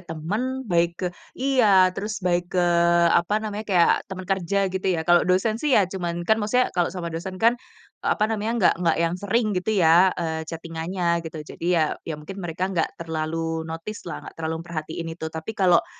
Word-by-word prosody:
teman, 210 +11 -3
baik 170 -3 +1
ke 180 - -3 0.3
iya, 215 -9 +4
terus 210 +1 -5
baik 175 0 0
ke, 175 - +3 0.5
apa 175 +5 +2
namanya, 215 0 -4
kayak 175 -4 +5 0.2
teman 190 -1 -6
kerja 195 +1 0
gitu 190 0 -3
ya, 170 -3 0
kalau 175 +1 +4
dosen 215 +5 +1
sih 295 -4 +3
ya 205 - +5
cuman, 175 -2 -4
kan 220 +4 +2
maksudnya 250 +5 +1
kalau 175 -2 +1
sama 170 -2 -5
dosen 185 +3 -5
kan, 230 +5 +4 0.5
apa 210 - +1
namanya, 220 0 -1
nggak 215 - +4
nggak 170 -2 +2
yang 165 - 0
sering 215 +3 +1
gitu 195 +3 -1
ya, 175 +1 +6
eee, 160 -2 -2
chatting-an-nya 170 +1 -2
gitu, 160 -2 -7
jadi 170 - -6
ya 160 - +4 0.2
ya 160 - -3
mungkin 175 +6 -9
mereka 175 0 -3
nggak 170 -3 -1
terlalu 160 0 -3
notice 165 +5 -7
lah, - - -6
nggak - - -11
terlalu 160 +1 -3
memperhatikan 165 0 -5
itu. 160 -1 -6
Tapi 160 +6 -6
kalau 185 -5 +3
180 Hz, 190 wpm, -24 LUFS, 165-205 Hz, 0.5 s, ya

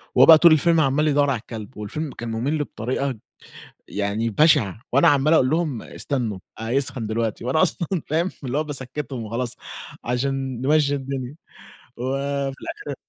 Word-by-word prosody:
وهو - - +8
بقى 160 -1 +10
طول 170 +1 +7
الفيلم 165 +2 +4
عَمّال 145 +2 +2
يدوّر 145 -1 +3
على 130 -4 0
الكلب 110 +1 -9
والفيلم 135 +8 -4
كان 120 - -6
مُمِل 135 +8 -1
بطريقة 130 0 -3 0.7
يعني 105 +3 -1
بَشِعة 115 - +3
وأنا 140 +3 +5
عَمّال 145 +2 +4
أقول 130 -5 +4
لهم: 155 -7 -1
"استنّوا، 115 -8 -3 0.2
هيسخن 120 0 -2
دلوقتي." 115 +1 -2
وأنا 145 +7 +2
أصلًا 170 -2 0 0.2
فاهم، 165 +5 0
اللي 130 +2 -2
هو 155 - +1
باسكّتهم 135 -3 -5
وخلاص 120 +3 -4 0.5
عشان 130 0 -2
نمشّي 145 0 +3
الدنيا 135 0 -5 0.6
وفي 135 +2 -2
الأخِر 340 +6 -6
135 Hz, 150 wpm, -23 LUFS, 120-150 Hz, 0.7 s, بقى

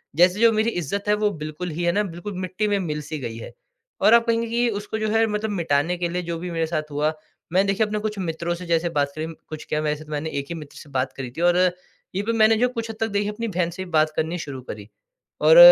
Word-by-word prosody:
जैसे 180 +4 +5
जो 230 0 +6
मेरी 220 +1 +2
इज़्ज़त 200 +1 -3
है, 210 - +4
वो 210 0 +2
बिल्कुल 155 +1 -5
ही 165 +2 -3
है 170 - +3
ना, 210 +4 +2
बिल्कुल 180 +2 -6
मिट्टी 185 +3 -1
में 205 -1 +2
मिल-सी 150 -3 -3
गई 115 -4 -5
है। - - -8 0.5
और 220 - +6
आप 235 0 +6
कहेंगे 230 0 +2
कि 240 +1 +2
उसको 210 0 -3
जो 215 0 0
है 225 +1 +4
मतलब 210 0 -1
मिटाने 170 -2 +1
के 175 -1 -1
लिए 180 +1 -1
जो 170 -1 -3
भी 180 +1 -5
मेरे 165 -1 0
साथ 155 -2 -3
हुआ, 150 +2 +1 0.4
मैंने 190 +2 +4
देखिए 195 +2 +2
अपने 210 0 -2
कुछ 215 0 -3
मित्रों 170 -1 -2
से 180 +1 -8
जैसे 170 0 +1
बात 145 -3 0
करी, 155 0 -3 0.2
कुछ 155 -1 -7
क्या, 150 - +1
वैसे 150 0 -1
तो 150 - -13
मैंने 150 +2 -2
एक 140 - -4
ही 170 - -3
मित्र 150 -3 -10
से 145 - -11
बात 130 -1 -1
करी 130 -2 -5
थी 160 - -6
और 175 0 +4
यहीं 180 +2 -1
पर 230 - +1
मैंने 220 +1 +6
जो 245 +3 +4
कुछ 230 -2 -4
हद 225 - -5
तक 225 - +1
देखिए 205 0 0
अपनी 230 +2 -4
बहन 180 -4 0
से 185 +2 -5
भी - - -12
बात 155 -1 +4
करनी 165 +3 -1
शुरू 135 -5 -6
करी। 105 -4 -8 0.5
और, - - +7
175 Hz, 270 wpm, -24 LUFS, 155-210 Hz, 0.5 s, और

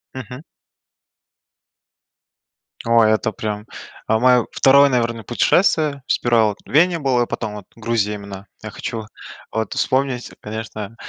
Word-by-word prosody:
Мгм. 125 +2 -8 2.5
Ой, 115 -2 +5
это 110 +1 0
прям 105 +1 -5 0.4
А 110 - +3
моё 125 -1 +4
2, 140 +1 +5
наверно, 115 -3 -1
путешествие, 145 - +2
сперва 120 -2 +2
вот 105 - -3
в - - -17
Вене 170 +4 +4
был, 135 -4 +1
а 120 - +1
потом 110 -3 -4
вот 105 -3 -9
Грузия 110 -2 -1
именно. 100 -1 -9 0.2
Я 110 - -6
хочу 110 +3 -5 0.5
вот 110 -2 -2
вспомнить, 130 -2 -1
конечно, 110 0 -7
115 Hz, 130 wpm, -20 LUFS, 110-130 Hz, 2.5 s, Ой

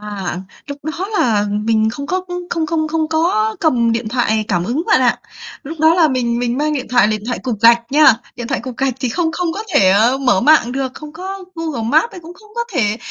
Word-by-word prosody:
À, 200 -4 -5 0.3
lúc 285 0 -7
đó 325 +4 -3
là 210 -4 +2
mình 220 +1 +1
không 280 +5 -6
có 370 +4 -1 0.3
không 325 -2 -1
không 315 -1 -1
không 315 0 -1
có 395 +8 +1
cầm 240 -8 +2
điện 230 -1 -2
thoại 220 -2 0
cảm 175 -4 0
ứng 250 - -1
bạn 440 - +4
ạ. - - +2 0.4
Lúc 310 +2 -8
đó 320 +1 +5
là 335 -3 +4
mình 240 -3 -1
mình 245 +1 -1
mang 305 +1 0
điện 265 -3 -3
thoại 245 -3 +4
điện 215 -1 -2
thoại 245 - -2
cục 235 -6 -3
gạch 235 +1 +6
nha, 295 -4 +6 0.2
điện 240 -1 -5
thoại 265 - -1
cục 250 -1 -8
gạch 270 -2 0
thì 255 - -1
không 325 +5 -1
không 345 -1 -2
có 405 +5 -5
thể 190 -8 +5 0.3
mở 250 -8 +2
mạng 295 -3 +4
được, 265 -1 -3
không 305 -1 -10
có 380 +3 -7
Google 320 -8 -4
Maps 315 - +3
ấy, 365 - -9
cũng 340 +1 -12
không 425 +3 -19
có 470 0 -2
thể 215 - +1
270 Hz, 240 wpm, -17 LUFS, 230-325 Hz, 0.4 s, gạch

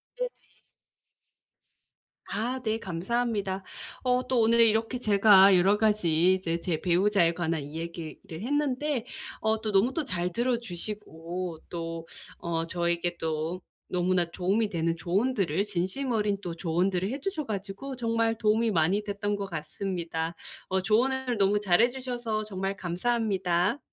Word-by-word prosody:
네네. - - -2 2.0
아 245 +4 -2
네 220 -1 0
감사합니다. 195 +1 -2 0.4
어 250 0 +2
또 255 -2 +2
오늘 230 +1 +4
이렇게 225 +2 +3
제가 200 -3 +6
여러 190 +3 +4
가지 185 -5 +3
이제 170 -3 -1
제 165 -2 -2
배우자에 180 -1 +3
관한 165 -3 -1
이야기를 165 +2 -6 0.3
했는데 285 -1 0 0.4
어 220 0 +1
또 215 - -1
너무 205 +6 +3
또 325 - -1
잘 180 -7 -2
들어 240 +3 +1
주시고 180 -4 -6
또 165 -1 -5 0.3
어 165 -1 -2
저에게 170 0 0
또 160 +3 -2 0.3
너무나 180 -1 +1
도움이 195 +5 0
되는 165 -2 -1
조언들을 195 - +1
진심 205 +7 -2
어린 210 -3 +1
또 175 -4 -5
조언들을 180 +3 0
해 270 +4 -3
주셔 375 -5 -2
가지고 205 +5 -5
정말 230 -2 0
도움이 220 +1 +2
많이 180 +4 +2
됐던 205 0 -2
것 200 - -3
같습니다. 165 0 -3 0.3
어 190 0 0
조언을 245 +4 +1
너무 200 +1 +3
잘 180 -4 +3
해 240 - +5
주셔서 245 -4 -3
정말 195 -1 -3
감사합니다. 190 +1 0
195 Hz, 285 characters per minute, -28 LUFS, 175-230 Hz, 2.0 s, 제가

